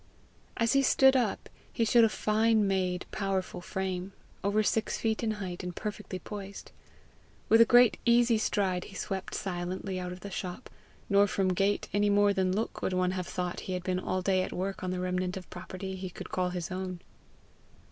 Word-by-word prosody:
As 230 -1 +2
he 275 - +5
stood 265 0 +5
up, 255 - 0 0.2
he 230 - 0
showed 230 +1 +6
a - - +2
fine 215 0 +2
made, 185 -2 0
powerful 195 -3 -2
frame, 190 0 -3 0.3
over 205 +2 +2
six 220 +1 0
feet 220 -1 -1
in 220 -2 0
height, 185 -4 -5
and 180 -1 -5
perfectly 205 -3 -5
poised. 200 0 -8 0.8
With 225 +1 +7
a - - +9
great 245 -1 +6
easy 235 -1 +4
stride 190 -4 0
he 195 - -12
swept 190 -1 -4
silently 185 0 -3
out 180 0 -4
of 180 +1 -9
the 200 - -7
shop; 180 -1 -6 0.4
nor 200 +1 +5
from 195 -1 0
gait 195 +3 +1
any 205 0 +3
more 205 0 +4
than 190 -1 +1
look 215 +4 -2
would 185 - -1
one 185 0 +1
have 185 -1 -3
thought 180 -1 -3
he - - -1
had 180 -1 -3
been 185 0 -1
all 185 0 -2
day 185 -1 +2
at - - -3
work 190 +1 -3
on 185 - -2
the 180 0 -2
remnant 180 0 -1
of 185 - -9
property 185 +1 -6
he 185 0 -5
could - - -9
call 180 -1 0
his 180 0 -4
own. 185 -1 -4
190 Hz, 200 wpm, -30 LUFS, 185-210 Hz, 0.8 s, a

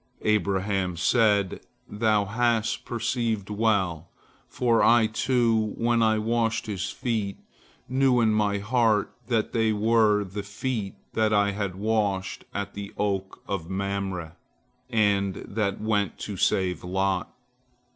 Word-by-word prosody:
Abraham 100 -3 0
said: 100 +1 +2 0.3
"Thou 105 -1 +1
hast 115 +1 0
perceived 115 -3 -2
well, 100 -6 0 0.4
for 120 -2 +1
I, 115 0 +5
too, 110 -1 +1
when 120 0 +2
I 110 -1 +3
washed 115 +1 0
his 100 -3 -3
feet, 110 -5 -2 0.5
knew 130 -1 +3
in 110 -2 +3
my 105 -1 +1
heart 110 0 +1
that 115 -3 0
they 110 -1 +2
were 105 -1 +3
the 100 +1 -5
feet 100 0 -4 0.2
that 110 -1 +2
I 100 -1 +3
had 100 -2 -3
washed 100 -2 -1
at 100 0 -4
the 100 0 -7
oak 95 -2 -2
of 95 -4 -3
Mamre, 95 -3 -3 0.5
and 100 -4 +2
that 100 -1 -3
went 105 -3 0
to 105 - -5
save 90 -2 +1
Lot." 95 0 -1
105 Hz, 125 wpm, -26 LUFS, 100-115 Hz, 0.5 s, I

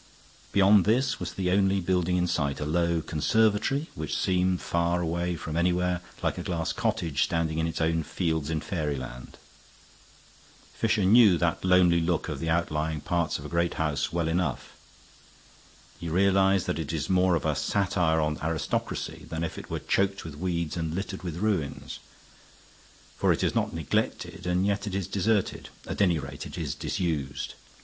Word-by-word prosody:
Beyond 100 -1 +5
this 125 +5 +2
was - - -4
the 90 -2 -1
only 95 0 +3
building 90 -1 +1
in 90 - +2
sight, 75 -5 -1
a 75 - -2
low 85 +1 +1
conservatory, 110 - +1
which 75 -1 -3
seemed 90 0 +1
far 85 +1 0
away 85 +1 -1
from 80 -1 -5
anywhere, 90 +1 +1 0.2
like - - 0
a - - -2
glass 85 -2 -2
cottage 80 -5 -1
standing 80 -1 -1
in 80 - +1
its 80 -1 -4
own 80 0 +1
fields 80 -2 -2
in 80 -1 -1
fairyland. 70 -9 -4 1.4
Fisher 110 -3 +1
knew 105 -2 +7
that 85 -1 0
lonely 90 -2 +5
look 85 0 0
of 75 -3 -4
the 80 - -2
outlying 80 -2 0
parts 85 +2 -1
of - - -10
a - - -6
great 85 0 0
house 75 -2 -1
well 85 -1 0
enough. 90 +2 -1 1.3
He 85 - -4
realized 95 +1 +3
that 80 - -2
it 80 -2 -3
is 80 -3 -2
more 90 -1 +3
of 80 - -2
a 75 - +2
satire 85 0 +1
on 75 0 -1
aristocracy 80 -1 -3
than 80 +1 -3
if 80 - -3
it - - -11
were - - -2
choked 100 -1 0
with 80 - -6
weeds 85 -1 -2
and 80 -1 -2
littered 95 0 -4
with 85 -3 -5
ruins. 95 -7 -2 1.2
For - - +3
it - - 0
is - - +1
not - - 0
neglected 80 +4 -2
and 90 +2 +1
yet 100 +1 0
it 95 - -3
is 100 -2 -1
deserted; 100 +2 0 0.2
at - - -3
any 90 -4 +4
rate, 70 0 -6
it - - -9
is - - -2
disused. 75 -6 -3
85 Hz, 175 wpm, -27 LUFS, 80-95 Hz, 1.4 s, knew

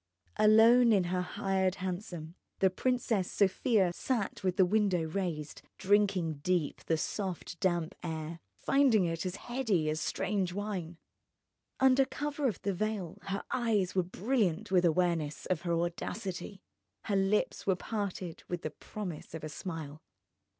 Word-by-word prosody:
Alone 225 +3 +7
in 200 -4 +4
her 180 +1 -1
hired 190 +1 0
hansom 175 -3 -5 0.2
the 190 -1 +3
Princess 230 -3 0
Sofia 195 -1 +2
sat 220 -2 -2
with 185 -1 0
the 190 - +6
window 195 -3 +2
raised, 160 -3 -3 0.2
drinking 190 -6 +2
deep 170 -1 0
of - - -20
the 160 - +2
soft 180 0 -4
damp 175 -4 0
air, 160 0 -5 0.2
finding 260 -9 +3
it 165 +2 -2
as 180 - -4
heady 215 -11 0
as 155 0 -2
strange 190 -1 -1
wine. 185 -5 -4 0.8
Under 265 0 +6
cover 290 +1 -2
of 220 - -2
the 200 - 0
veil 200 -3 -3
her 195 +1 -2
eyes 220 -7 +1
were 185 - +3
brilliant 205 0 -1
with 180 -2 +4
awareness 165 -3 +1
of 180 -4 -1
her 175 -1 -1
audacity, 180 +2 -4 0.4
her 205 - -1
lips 195 +2 +1
were 190 - +4
parted 190 -4 -4
with 175 -1 -3
the 155 - -3
promise 180 -3 -7
of 160 - -7
a 155 - -4
smile. 155 -2 -6
185 Hz, 150 wpm, -31 LUFS, 170-210 Hz, 0.8 s, Alone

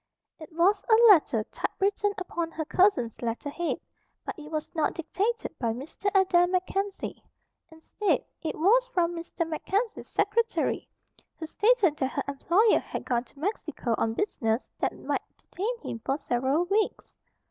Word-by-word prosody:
It 315 0 -11
was 375 +5 +3
a 445 - +8 0.2
letter 250 - +2
typewritten 405 +1 0
upon 345 -3 -3
her 320 -1 -4
cousin's 350 - +2
letter 240 +5 -3
head; 345 +3 -2 0.5
but - - -3
it 305 -4 -10
was 310 -1 -4
not 315 -2 0
dictated 415 +8 -2
by 230 -3 0
Mr. 280 - -3
Adair 355 -2 +4
MacKenzie. 380 +2 -2 0.5
Instead, 320 +6 -1 0.2
it 320 - -3
was 465 +10 +4
from 345 -1 0
Mr. 335 0 -4
MacKenzie's 400 +8 -2
secretary, 455 +3 0 0.5
who 320 - -5
stated 405 -2 +3
that 265 -2 -1
her - - -1
employer 345 +10 +3
had - - -6
gone 240 0 0
to 275 - -25
Mexico 310 - -2
on 225 0 0
business 230 - -1
that - - -1
might - - -2 0.2
detain 455 +6 -4
him 230 - -5
for 270 +1 0
several 275 +3 0
weeks. 405 +4 -1
340 Hz, 150 wpm, -28 LUFS, 290-405 Hz, 0.5 s, a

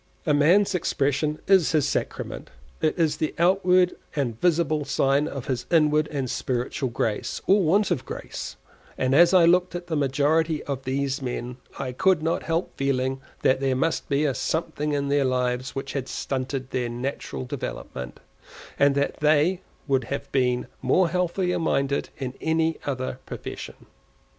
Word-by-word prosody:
A 150 - +3
man's 170 +8 +4
expression 150 -3 0
is 190 -5 +4
his 150 -2 +3
sacrament; - - -3 0.3
it 155 - +1
is 155 -3 +1
the 155 - -2
outward 180 +1 +3 0.2
and 120 -6 -2
visible 160 -3 +2
sign 140 +1 +2
of 135 -5 -6
his 125 -3 -3
inward 155 -2 +3
and 140 -3 -3
spiritual 125 +2 -2
grace, 110 -2 -2
or 200 +2 +5
want 190 +4 +2
of 140 -7 0
grace; - - -7 0.4
and 130 0 +1
as 170 +4 +7
I 180 -3 +6
looked 180 +1 +3
at 175 0 -5
the 175 - -5
a 155 - +1
majority 150 +3 +1
of 135 -2 -5
these 135 +1 -1
men, 125 -1 -4 0.2
I 130 -2 -3
could 165 +5 +2
not 165 +1 0
help 165 +2 -2
feeling 135 -1 0 0.2
that 130 - +4
there 135 -1 +1
must 160 +5 -1
be 140 +1 +2
a 140 - +1
something 150 0 -2
in 140 -1 -1
their 140 0 +3
lives 125 0 -1
which 135 0 -4
had 135 -2 -3
stunted 130 -1 -3
their 125 -2 -1
natural 120 - -4
development, 65 0 -6 0.6
and 140 0 +4
that 140 0 0
they 155 +5 +3 0.3
would 135 -3 +1
have 140 +4 -5
been 125 -2 +1 0.2
more 170 +7 +3
healthily 180 +1 0
minded 140 -3 0
in 130 -2 -4
any 160 0 +1
other 130 -2 -3
profession. - - -8
145 Hz, 165 wpm, -25 LUFS, 130-165 Hz, 0.6 s, as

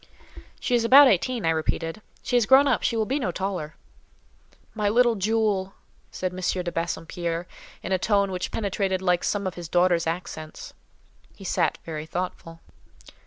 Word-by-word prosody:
"She - - -2
is 240 -1 +3
about 270 +4 +8
eighteen," 235 0 +1
I 165 - +3
repeated. 165 +3 -2 0.2
"She 245 - -1
is 240 -3 +3
grown 270 +2 +7
up; 255 - +2
she 230 - 0
will 220 - +1
be 270 +6 -1
no 215 -9 -1
taller." 180 -5 -4 1.0
"My 210 -2 0
little 240 +2 +4
jewel!" 205 -2 0 0.3
said 185 -1 -4
M. - - -8
de 180 -1 -1
Bassompierre, 170 0 -3 0.4
in - - -5
a 190 - +2
tone 200 -1 +1
which 185 -1 -3
penetrated 195 -3 -2
like 180 -1 +2
some 200 -1 -1
of 185 - -2
his 170 -2 -8
daughter's 175 -1 +2
accents. 165 -2 -6 0.6
He - - -13
sat - - 0
very 155 -1 -6
thoughtful. 165 -1 -5
185 Hz, 165 wpm, -25 LUFS, 170-220 Hz, 1.0 s, about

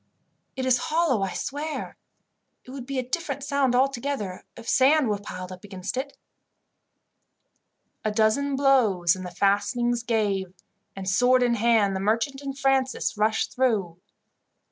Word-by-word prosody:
"It 260 - -3
is 250 -1 +3
hollow, 315 -9 +2
I 195 -1 -2
swear. 300 +3 -4 0.7
It 255 - -11
would 260 -2 -8
be 275 -1 -3
a 255 -1 -2
different 280 -1 -3
sound 280 -3 +1
altogether 255 -7 -1
if 230 0 -11
sand 275 -1 +4
was 205 -1 -1
piled 185 -2 -7
up 185 0 -10
against 195 0 -6
it." 275 +2 -4 1.9
A 215 - +1
dozen 225 +6 +1
blows 220 -11 +3
and 185 - -7
the 180 - -5
fastenings 205 +6 +1
gave, 200 -5 -1 0.4
and, 195 -1 -6
sword 250 +6 +4
in 240 -1 +2
hand, 225 -3 +2
the - - -2
merchant 230 +7 0
and 275 -1 -6
Francis 270 -3 +1
rushed 215 +1 0
through. 205 -10 0
240 Hz, 145 wpm, -25 LUFS, 200-270 Hz, 1.9 s, sand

